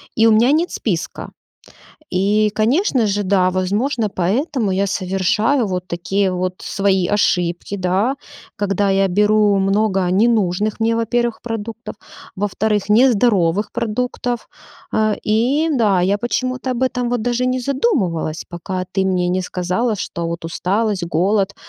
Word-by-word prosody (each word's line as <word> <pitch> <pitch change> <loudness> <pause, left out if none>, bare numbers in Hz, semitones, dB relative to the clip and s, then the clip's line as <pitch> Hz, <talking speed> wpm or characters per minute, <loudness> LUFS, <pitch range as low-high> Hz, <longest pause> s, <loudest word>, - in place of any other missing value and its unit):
и 225 - +4
у - - +5
меня 230 +5 +4
нет 330 +4 +1
списка. - - -3 0.8
И, 205 +3 +2
конечно 255 - +2
же, 205 +1 -1
да, 185 -1 +2
возможно, 210 +6 0
поэтому 210 - -1
я 195 +2 +1
совершаю 200 +7 0
вот 185 -1 -4
такие 190 +3 -1
вот 185 0 -2
свои 190 -3 0
ошибки, 180 -2 0
да. 190 +7 0 0.4
Когда 200 -1 0
я 195 0 +2
беру 210 +2 +3
много 195 -1 +1
ненужных 210 -1 +1
мне, 225 +1 +2
во-первых, 235 0 -1
продуктов, 225 0 -6 0.4
во-вторых, 205 +1 -1
нездоровых 210 -5 +3
продуктов. 240 +1 -3 0.4
А-а, 215 -1 +1
и 250 +9 +1
да, 215 - +2
я 190 +3 +2
почему-то 255 +3 -2
об 250 +1 0
этом 250 -2 -1
вот 245 -2 -1
даже 245 +1 0
не 255 0 0
задумывалась, 230 - -1
пока 185 +1 -4
ты 190 0 +1
мне 185 -2 +1
не 185 +1 0
сказала, 185 +6 -1
что 170 -3 -4
вот 170 0 -5
усталость, 190 +3 -1
голод, 195 +4 +1
205 Hz, 140 wpm, -19 LUFS, 185-235 Hz, 0.8 s, у